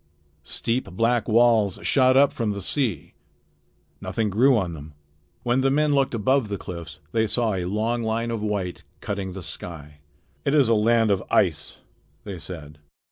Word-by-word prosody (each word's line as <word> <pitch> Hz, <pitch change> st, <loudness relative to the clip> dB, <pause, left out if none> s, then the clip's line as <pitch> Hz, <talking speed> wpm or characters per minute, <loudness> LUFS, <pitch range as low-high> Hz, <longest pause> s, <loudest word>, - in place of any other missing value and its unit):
Steep 115 Hz, -, -1 dB
black 115 Hz, +4 st, +1 dB
walls 115 Hz, -4 st, +3 dB
shot 130 Hz, -1 st, +4 dB
up 140 Hz, +1 st, +5 dB
from 115 Hz, -7 st, -1 dB
the 100 Hz, -, -5 dB
sea. 125 Hz, -, -2 dB, 0.9 s
Nothing 110 Hz, -3 st, -2 dB
grew 125 Hz, +5 st, +4 dB
on 90 Hz, -5 st, -2 dB
them. 75 Hz, -1 st, -10 dB, 0.5 s
When 120 Hz, +2 st, +1 dB
the 135 Hz, -, +3 dB
men 150 Hz, +2 st, +2 dB
looked 135 Hz, -3 st, +1 dB
above 125 Hz, +3 st, +1 dB
the 100 Hz, -1 st, -3 dB
cliffs 85 Hz, -5 st, -8 dB
they 110 Hz, -1 st, +1 dB
saw 115 Hz, 0 st, +1 dB
a 90 Hz, -2 st, -2 dB
long 110 Hz, +5 st, -1 dB
line 115 Hz, +1 st, -1 dB
of 115 Hz, -2 st, -3 dB
white 100 Hz, -4 st, -3 dB, 0.2 s
cutting 100 Hz, -2 st, -4 dB
the 95 Hz, -1 st, -7 dB
sky. 75 Hz, -2 st, -6 dB, 0.4 s
"It 140 Hz, -, +1 dB
is 140 Hz, -6 st, +4 dB
a -, -, +5 dB
land 115 Hz, 0 st, +3 dB
of 95 Hz, -2 st, +1 dB
ice," -, -, 0 dB, 0.4 s
they 100 Hz, -4 st, -7 dB
said. 75 Hz, -2 st, -9 dB
110 Hz, 170 wpm, -24 LUFS, 95-120 Hz, 0.9 s, up